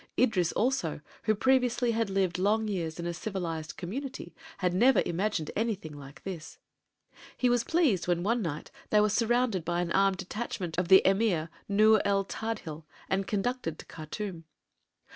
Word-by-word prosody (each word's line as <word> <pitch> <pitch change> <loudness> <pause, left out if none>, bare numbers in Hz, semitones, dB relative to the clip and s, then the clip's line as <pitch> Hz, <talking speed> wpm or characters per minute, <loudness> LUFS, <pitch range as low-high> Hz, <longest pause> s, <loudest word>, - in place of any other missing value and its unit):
Idris, 190 -9 +2
also, 230 - 0 0.3
who 215 - +3
previously 250 0 +2
had 225 -2 0
lived 190 -2 0
long 215 +3 +2
years 170 -6 -3
in 170 - -4
a 170 - -2
civilized 165 -3 -4
community, 220 - -6 0.2
had 180 -2 0
never 245 +8 +5
imagined 175 -2 -1
anything 205 -8 -2
like 140 -1 -12
this. 175 -5 -7 0.8
He 250 -1 +2
was 245 -1 +2
pleased 285 - +2
when 175 -1 +1
one 230 +4 +1
night 155 -5 -4 0.2
they 210 - +4
were 210 0 +4
surrounded 230 -3 +1
by 175 +1 -1
an 175 -1 -1
armed 195 0 +3
detachment 185 -3 -4
of 180 - 0
the 190 +1 +7
Emir 190 -5 +2 0.2
Nur 215 +1 +5
el 200 -1 +2
Tadhil 190 -9 -5 0.3
and 190 0 0
conducted 205 -5 -2
to - - -11
Khartûm. 165 +2 -6
195 Hz, 160 wpm, -29 LUFS, 170-225 Hz, 0.8 s, the